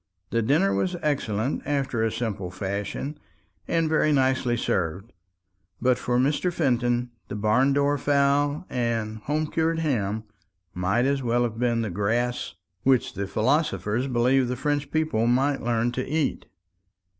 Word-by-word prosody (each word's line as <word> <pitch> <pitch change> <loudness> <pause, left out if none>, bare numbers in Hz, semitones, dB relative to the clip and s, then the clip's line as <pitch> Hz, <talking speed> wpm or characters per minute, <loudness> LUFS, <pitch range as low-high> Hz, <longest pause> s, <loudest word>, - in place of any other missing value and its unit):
The 115 - +2
dinner 155 - +2
was 185 -1 0
excellent 130 -4 -1
after 135 -5 -1
a 115 - +1
simple 105 -6 -3
fashion, 100 +10 -4 0.5
and 165 -1 +1
very 155 -1 +2
nicely 130 -3 +2
served; 95 +3 -2 0.7
but 125 0 +2
for 120 0 0
Mr. 145 +7 +1
Fenton 120 -6 0 0.2
the - - -5
barn 110 +6 +3
door 145 +1 +2
fowl 145 +3 +2
and 115 -3 -2
home 150 +7 -1
cured 160 +1 0
ham 110 -9 -1 0.5
might 95 +7 +1
as 140 0 +1
well 120 0 +1
have 115 -1 -3
been 120 -2 +1
the 105 - -3
grass 115 +6 -1 0.3
which 130 -2 +2
the 100 0 -3
philosopher 115 - 0
believed 125 +1 +2
the 125 - -2
French 145 +2 -1
people 155 -8 +1
might 135 +4 +2
learn 120 0 0
to 125 +1 -2
eat. 150 +2 -1
125 Hz, 145 wpm, -25 LUFS, 110-145 Hz, 0.7 s, barn